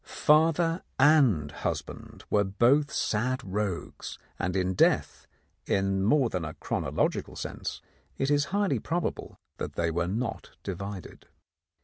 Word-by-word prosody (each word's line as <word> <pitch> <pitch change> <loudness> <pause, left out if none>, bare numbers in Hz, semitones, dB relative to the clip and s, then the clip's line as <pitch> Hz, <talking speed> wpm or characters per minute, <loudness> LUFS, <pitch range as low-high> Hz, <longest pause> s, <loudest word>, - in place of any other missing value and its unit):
Father 165 +3 +3 0.2
and 130 - +4
husband - - -5
were 105 - +4
both 120 +9 +3
sad 125 +5 0
rogues, 100 -2 -4 0.2
and 90 +1 -1
in 95 0 +1
death, - - +2 0.4
in 95 0 +1
more 130 +5 +4
than 90 -3 -2
a 80 0 -5
chronological - - -1
sense, - - -5 0.3
it 135 +2 0
is 145 0 +3
highly 200 +3 0
probable 170 0 -3 0.2
that - - -4
they 85 -1 0
were 85 +1 0
not 115 +4 -4
divided. 100 0 -6
105 Hz, 125 wpm, -28 LUFS, 95-145 Hz, 0.4 s, and